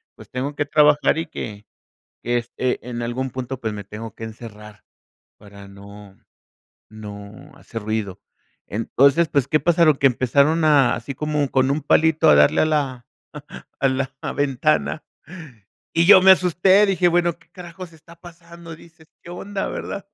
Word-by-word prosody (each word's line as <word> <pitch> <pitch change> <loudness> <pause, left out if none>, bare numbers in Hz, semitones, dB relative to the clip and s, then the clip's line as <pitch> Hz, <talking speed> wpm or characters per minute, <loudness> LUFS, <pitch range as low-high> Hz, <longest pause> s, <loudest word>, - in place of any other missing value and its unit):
pues, - - -16
tengo 135 +3 -4
que 145 - -2
trabajar 150 +1 +3
y 165 - -3
que 105 -8 -8 0.6
que 120 +1 0
este, 125 +1 -4
en 120 -1 -5
algún 125 +2 -4
punto, 130 0 -6
pues, 110 -3 -4
me 105 -1 -7
tengo 105 +2 -9
que 115 - -11
encerrar 105 -2 -12 0.5
para 100 -1 -15
no 100 0 -14 0.7
no 105 -1 -11
hacer 115 -1 -9
ruido. 105 -3 -4 0.5
Entonces, 140 +9 +1
pues, 140 -3 0
¿qué 155 +2 +1
pasaron? 165 -3 +3
Que 135 - -1
empezaron 140 +6 +1
así 140 -3 +2
como 150 -1 -2
con 130 0 +1
un 150 +2 -2
palito 160 +2 +3
a 75 - +7
darle 75 0 +4
a - - +3
la 140 -5 -2 0.8
a 135 - +3
la 130 0 -2 0.2
ventana. 145 +2 -1 0.9
Y 165 +1 +2
yo 190 -2 +8
me 190 - +7
asusté, 185 +3 +3
dije: 185 -2 +2
"Bueno, 175 -1 +1
¿qué 175 -2 -27
carajo 175 +1 -12
está 165 0 -17
pasando?". 170 -1 -13
Dices: 160 -1 -19 0.2
"¿Qué 170 - -11
onda?", 195 +2 -5
¿verdad? 200 -1 -6
140 Hz, 160 wpm, -21 LUFS, 115-165 Hz, 0.9 s, yo